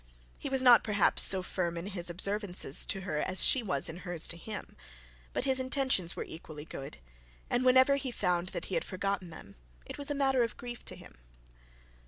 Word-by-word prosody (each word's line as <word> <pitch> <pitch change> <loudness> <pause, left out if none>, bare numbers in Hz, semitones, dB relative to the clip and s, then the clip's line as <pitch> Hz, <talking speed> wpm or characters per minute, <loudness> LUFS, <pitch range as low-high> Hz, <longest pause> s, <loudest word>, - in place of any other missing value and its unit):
He - - -5
was 265 -1 0
not 245 -2 +7
perhaps 205 -3 +2
so 190 -1 +4
firm 170 -2 -3
in 170 - -5
his 185 -3 -4
observances 185 -4 +1
to 195 - -3
her, 155 -5 -3
as 185 +3 0
she 265 - +4
was 180 -11 +2
in 160 - -6
hers 175 -3 -2
to - - -3
him. 205 +5 -8 0.6
But - - -2
his 265 -1 +4
intentions 260 - +2
were - - -4
equally 155 -2 -10
good, 135 -4 -8 0.5
and 245 - +1
whenever 260 +2 +5
he 270 -1 -4
found 180 -6 -1
that - - -5
he - - -8
had - - 0
forgotten 195 -1 -3
them, 100 -11 -13 0.3
it - - -9
was 285 +1 -2
a 290 - -1
matter 270 -2 +2
of 230 - -2
grief 240 0 -8
to - - -6
him. - - -15
195 Hz, 205 wpm, -31 LUFS, 175-255 Hz, 0.6 s, not